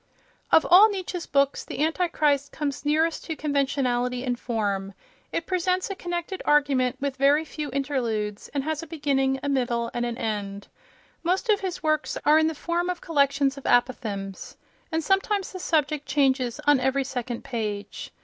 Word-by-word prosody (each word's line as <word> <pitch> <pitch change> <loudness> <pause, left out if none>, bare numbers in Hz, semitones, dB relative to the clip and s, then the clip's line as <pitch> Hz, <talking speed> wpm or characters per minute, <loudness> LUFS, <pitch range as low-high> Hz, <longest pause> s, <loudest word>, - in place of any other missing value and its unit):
Of 320 - +6
all 390 +5 +8
Nietzsche's 370 -3 -4
books, 275 0 +1
"The 290 - -3
Antichrist" 305 -4 +1
comes 285 -3 -3
nearest 315 +2 +1
to 320 - -3
conventionality 260 -4 0
in 250 -2 0
form. 200 -5 -2 0.4
It 335 - -2
presents 365 +1 0
a - - -3
connected 350 +1 -4
argument 275 -4 +2
with 275 -1 -3
very 285 +3 +4
few 305 -1 -5
interludes, 240 -7 -2
and 280 -1 -2
has 310 0 -2
a 330 - -9
beginning, 275 -4 0
a - - -2
middle 240 -4 0
and 240 - -1
an 240 -1 -3
end. 205 -3 -4 0.5
Most 370 +7 0
of 415 -2 +4
his 370 -3 -4
works 310 -1 0
are 305 +1 +6
in 315 - +3
the 320 - -2
form 345 +4 -1
of 360 -1 -2
col 330 -3 -7
lections 280 0 +3
of - - -17
apothegms, 210 -6 -1 0.4
and 320 0 0
sometimes 390 +2 +1
the 370 - -7
subject 305 -4 0
changes 260 -4 +1
on 290 -2 +5
every 265 +2 +1
second 245 -2 -4
page. 210 -4 -4
280 Hz, 170 wpm, -25 LUFS, 250-320 Hz, 0.5 s, all